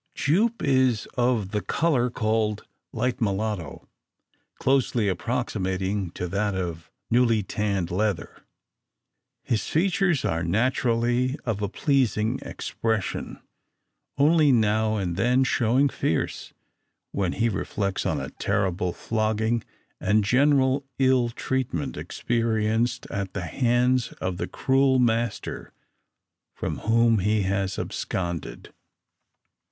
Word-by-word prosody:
"Jupe" 215 Hz, -, +1 dB
is 130 Hz, -5 st, +2 dB
of 120 Hz, -6 st, +1 dB
the 105 Hz, -, -1 dB
colour 135 Hz, -5 st, +1 dB
called 110 Hz, -2 st, -1 dB, 0.3 s
"light 125 Hz, -1 st, -2 dB
mulatto," 105 Hz, -3 st, -2 dB, 0.7 s
closely 125 Hz, -5 st, +1 dB
approximating 95 Hz, -2 st, -1 dB
to 90 Hz, -, -4 dB
that 100 Hz, +2 st, -1 dB
of 85 Hz, -3 st, -4 dB, 0.2 s
newly 115 Hz, -3 st, +3 dB
tanned 100 Hz, -3 st, -2 dB
leather. 100 Hz, -1 st, -2 dB, 1.0 s
His 110 Hz, -, -1 dB
features 175 Hz, -2 st, +1 dB
are 85 Hz, +1 st, 0 dB
naturally 120 Hz, -, +1 dB
of 110 Hz, -4 st, -2 dB
a 100 Hz, -, -1 dB
pleasing 120 Hz, -4 st, +1 dB
expression; 110 Hz, -4 st, -3 dB, 0.8 s
only 150 Hz, +1 st, +5 dB
now 110 Hz, -2 st, +2 dB
and 90 Hz, -5 st, -2 dB
then 125 Hz, +6 st, +3 dB
showing 130 Hz, +2 st, +2 dB
fierce, 80 Hz, -, -2 dB, 0.6 s
when 95 Hz, -3 st, -1 dB
he 115 Hz, -, +1 dB
reflects 100 Hz, -1 st, -2 dB
on -, -, 0 dB
a -, -, -6 dB
terrible 90 Hz, -1 st, -1 dB
flogging, 110 Hz, +1 st, 0 dB, 0.4 s
and 105 Hz, 0 st, +2 dB
general 135 Hz, +3 st, +3 dB
ill 130 Hz, -2 st, +3 dB
treatment 120 Hz, -, -2 dB
experienced, 115 Hz, 0 st, -1 dB
at 100 Hz, -2 st, -3 dB
the 95 Hz, -3 st, -3 dB
hands 125 Hz, +4 st, +1 dB
of 95 Hz, -1 st, -4 dB
the -, -, -3 dB
cruel 135 Hz, 0 st, +2 dB
master 115 Hz, -3 st, -1 dB, 0.8 s
from -, -, -4 dB
whom 115 Hz, 0 st, +3 dB
he 105 Hz, +2 st, +1 dB
has 95 Hz, 0 st, -1 dB
absconded. 85 Hz, -2 st, -4 dB
110 Hz, 110 wpm, -25 LUFS, 100-125 Hz, 1.0 s, only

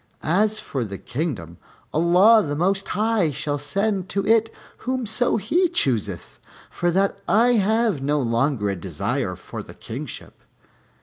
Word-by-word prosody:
As 210 Hz, +6 st, +2 dB
for 135 Hz, -, -3 dB
the 100 Hz, -3 st, -6 dB
kingdom, 115 Hz, -, -4 dB, 0.3 s
Allah 180 Hz, +8 st, +6 dB
the 145 Hz, -6 st, -3 dB
Most 195 Hz, +5 st, 0 dB
High 215 Hz, -5 st, +1 dB
shall 145 Hz, +1 st, -3 dB
send 195 Hz, +6 st, -1 dB
to 195 Hz, -1 st, -1 dB
it 225 Hz, +1 st, +3 dB, 0.3 s
whomso 245 Hz, -2 st, 0 dB
He 335 Hz, -, +1 dB
chooseth, 110 Hz, -, -2 dB, 0.3 s
for 175 Hz, -, 0 dB
that 195 Hz, +3 st, +1 dB
I 235 Hz, +4 st, +4 dB
have 220 Hz, -, +2 dB
no 145 Hz, +2 st, +1 dB
longer 115 Hz, -2 st, 0 dB
a -, -, -3 dB
desire 85 Hz, -, -3 dB
for -, -, -8 dB
the -, -, -12 dB
kingship." -, -, -8 dB
190 Hz, 140 wpm, -23 LUFS, 140-220 Hz, 0.3 s, Allah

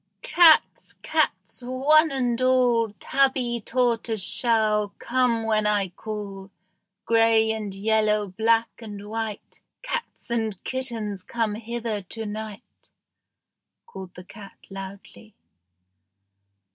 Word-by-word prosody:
"Cats, 345 Hz, -10 st, +4 dB
cats, -, -, -1 dB
one 280 Hz, +6 st, +3 dB
and 250 Hz, -3 st, -1 dB
all, 245 Hz, -3 st, +3 dB
Tabby, 260 Hz, -3 st, +1 dB
tortoise 230 Hz, -2 st, 0 dB
shell, 215 Hz, -2 st, +1 dB
come 240 Hz, -2 st, 0 dB
when 215 Hz, -1 st, +1 dB
I 205 Hz, -2 st, +1 dB
call, 200 Hz, 0 st, -7 dB, 0.6 s
Gray 225 Hz, -1 st, +4 dB
and 215 Hz, -2 st, -4 dB
yellow, 215 Hz, 0 st, +1 dB
black 225 Hz, +4 st, +1 dB
and 205 Hz, -2 st, -9 dB
white 220 Hz, -1 st, -6 dB, 0.2 s
Cats -, -, -5 dB
and 220 Hz, -4 st, -1 dB
kittens, 230 Hz, -7 st, -4 dB
come 225 Hz, +2 st, -2 dB
hither 225 Hz, -1 st, -4 dB
to 220 Hz, +4 st, -7 dB
night." 215 Hz, 0 st, -9 dB, 1.0 s
called 190 Hz, -, -10 dB
the 180 Hz, -, -10 dB
cat 200 Hz, +2 st, -13 dB
loudly. 190 Hz, -, -10 dB
225 Hz, 105 wpm, -24 LUFS, 210-240 Hz, 1.0 s, Cats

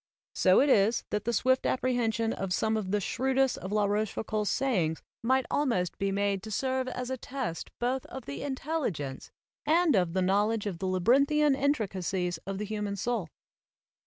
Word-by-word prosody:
So 185 Hz, 0 st, +4 dB
it 285 Hz, -, +3 dB
is 215 Hz, -1 st, +3 dB
that 210 Hz, 0 st, -1 dB
the 235 Hz, -, +1 dB
swift 260 Hz, +4 st, +2 dB
appre 255 Hz, -1 st, 0 dB
hension 225 Hz, -1 st, 0 dB
of 190 Hz, -1 st, -2 dB
some 220 Hz, 0 st, +1 dB
of 210 Hz, -4 st, -2 dB
the 210 Hz, +2 st, +1 dB
shrewdest 265 Hz, +5 st, +1 dB
of 190 Hz, -, -6 dB
La 210 Hz, -1 st, +2 dB
Roche 210 Hz, +1 st, 0 dB
foucauld's 215 Hz, -1 st, -1 dB
sayings 185 Hz, -12 st, 0 dB, 0.2 s
might 260 Hz, +2 st, +2 dB
almost 210 Hz, -12 st, 0 dB
be 195 Hz, 0 st, 0 dB
made 200 Hz, -1 st, 0 dB
to 220 Hz, -, -8 dB
serve 260 Hz, +4 st, -1 dB
as 250 Hz, 0 st, -4 dB
a 260 Hz, -, -2 dB
test 250 Hz, -9 st, -5 dB
both 250 Hz, +2 st, -1 dB
of 265 Hz, -2 st, -8 dB
the 140 Hz, -, -6 dB
intelligence 265 Hz, -, -3 dB, 0.3 s
and 320 Hz, -1 st, +3 dB
of 180 Hz, -3 st, +1 dB
the 185 Hz, 0 st, +1 dB
knowledge 205 Hz, +3 st, +1 dB
of 190 Hz, -5 st, -4 dB
the 190 Hz, -, -2 dB
labyrinthian 275 Hz, +11 st, +3 dB
intricacies 190 Hz, -, -1 dB
of 195 Hz, 0 st, -3 dB
the 210 Hz, -, -3 dB
human 210 Hz, -1 st, -3 dB
soul. 200 Hz, -4 st, -2 dB
220 Hz, 185 wpm, -29 LUFS, 195-260 Hz, 0.3 s, So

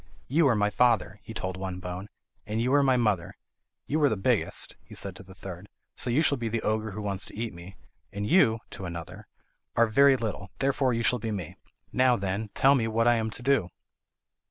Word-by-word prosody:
"You 150 Hz, +3 st, +3 dB
are 125 Hz, -, +3 dB
my 105 Hz, 0 st, +1 dB
father," 105 Hz, -6 st, +2 dB
he 115 Hz, -, -10 dB
told 95 Hz, -4 st, -4 dB
one 95 Hz, -1 st, -5 dB
bone, 90 Hz, +2 st, -6 dB, 0.4 s
"and 110 Hz, +1 st, -2 dB
you 125 Hz, +3 st, +1 dB
are 145 Hz, -, +5 dB
my 130 Hz, -2 st, +3 dB
mother. 105 Hz, -7 st, 0 dB, 0.5 s
You 155 Hz, +2 st, 0 dB
are 145 Hz, -, +5 dB
the 110 Hz, -, -1 dB
biggest," 95 Hz, -, 0 dB
he -, -, -13 dB
said 95 Hz, -2 st, -5 dB
to -, -, -11 dB
the 95 Hz, 0 st, -14 dB
third, 95 Hz, +1 st, -9 dB, 0.3 s
"so -, -, +3 dB
you 135 Hz, +7 st, +3 dB
shall 140 Hz, -4 st, +2 dB
be 115 Hz, -1 st, -2 dB
the 115 Hz, 0 st, -2 dB
ogre 110 Hz, 0 st, 0 dB
who 105 Hz, +1 st, -6 dB
wants 100 Hz, -1 st, -2 dB
to -, -, -12 dB
eat 115 Hz, -2 st, -3 dB
me; 85 Hz, +3 st, -11 dB, 0.4 s
and 100 Hz, 0 st, -4 dB
you," 120 Hz, -, +4 dB
to 95 Hz, -, -7 dB
another, 85 Hz, -1 st, -7 dB, 0.5 s
"are 115 Hz, -, +5 dB
very 135 Hz, +4 st, +5 dB
little, 105 Hz, -4 st, -4 dB
therefore 135 Hz, -1 st, +1 dB
you 115 Hz, 0 st, -1 dB
shall 125 Hz, +2 st, +2 dB
be 110 Hz, -, -4 dB
me. 95 Hz, -7 st, -5 dB, 0.4 s
Now, 130 Hz, -1 st, +4 dB
then, 100 Hz, +1 st, -3 dB
tell 135 Hz, +1 st, +5 dB
me 120 Hz, -5 st, +1 dB
what 115 Hz, +1 st, +1 dB
I 120 Hz, -, +6 dB
am 110 Hz, 0 st, -1 dB
to 120 Hz, +3 st, -7 dB
do." 135 Hz, -9 st, +2 dB
110 Hz, 225 wpm, -27 LUFS, 95-125 Hz, 0.5 s, I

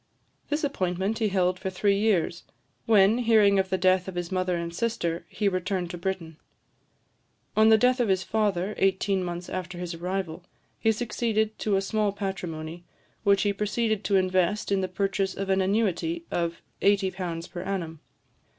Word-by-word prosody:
This 295 Hz, +1 st, -1 dB
appointment 195 Hz, -5 st, -1 dB
he 220 Hz, -, +2 dB
held 185 Hz, -1 st, +1 dB
for 190 Hz, -, -3 dB
three 200 Hz, +2 st, +1 dB
years, 185 Hz, -5 st, +1 dB, 0.4 s
when, 215 Hz, +1 st, +5 dB
hearing 215 Hz, -4 st, +4 dB
of 190 Hz, 0 st, 0 dB
the 190 Hz, -, +1 dB
death 185 Hz, 0 st, +3 dB
of 190 Hz, -, -6 dB
his 175 Hz, 0 st, -3 dB
mother 185 Hz, -1 st, 0 dB
and 170 Hz, 0 st, -4 dB
sister, 170 Hz, -5 st, -2 dB
he 210 Hz, -, -1 dB
returned 185 Hz, -1 st, -1 dB
to 175 Hz, -, -6 dB
Britain. 170 Hz, -4 st, -4 dB, 1.2 s
On 220 Hz, +1 st, +6 dB
the 220 Hz, -, +7 dB
death 250 Hz, +3 st, +3 dB
of 240 Hz, -, +2 dB
his 190 Hz, -1 st, +2 dB
father, 205 Hz, -3 st, 0 dB
eighteen 195 Hz, 0 st, +1 dB
months 175 Hz, 0 st, -5 dB
after 180 Hz, -1 st, -5 dB
his 175 Hz, -1 st, -4 dB
arrival, 175 Hz, 0 st, -4 dB, 0.4 s
he 225 Hz, -, +3 dB
succeeded 220 Hz, -1 st, -1 dB
to 210 Hz, -2 st, +1 dB
a 195 Hz, -, +1 dB
small 210 Hz, 0 st, 0 dB
patrimony, 175 Hz, -4 st, -5 dB, 0.4 s
which 200 Hz, -2 st, +4 dB
he 205 Hz, -1 st, +1 dB
proceeded 215 Hz, +1 st, -1 dB
to 200 Hz, -, +2 dB
invest 185 Hz, +2 st, +1 dB
in 195 Hz, -1 st, +2 dB
the 185 Hz, -, -1 dB
purchase 195 Hz, +1 st, -1 dB
of 195 Hz, 0 st, -2 dB
an 190 Hz, 0 st, +3 dB
annuity 220 Hz, -, 0 dB
of 170 Hz, -1 st, -2 dB, 0.2 s
£80 185 Hz, -4 st, 0 dB
per 175 Hz, -, -5 dB
annum. 170 Hz, -5 st, -4 dB
190 Hz, 170 wpm, -27 LUFS, 180-210 Hz, 1.2 s, the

